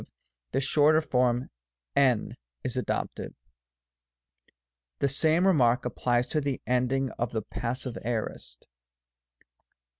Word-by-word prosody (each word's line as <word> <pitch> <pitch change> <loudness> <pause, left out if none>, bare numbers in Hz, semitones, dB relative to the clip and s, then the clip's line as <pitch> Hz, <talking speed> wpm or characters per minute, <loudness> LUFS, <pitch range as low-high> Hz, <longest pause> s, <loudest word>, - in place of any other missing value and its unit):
the 135 - +1
shorter 150 +3 +4
form 125 -4 +1 0.5
hv 130 -6 +3 0.3
is 125 - -3
adopted. 125 - -3 1.6
The 140 - +1
same 160 +6 +3
remark 125 -10 +3
applies 120 0 +1
to 155 - 0
the 140 -2 -2
end 125 0 +1
ing 135 -1 0
of 120 -1 -1
the 110 -2 -1
Passive 120 +2 -4
Aorist. 110 - -4
125 Hz, 110 wpm, -28 LUFS, 120-140 Hz, 1.6 s, shorter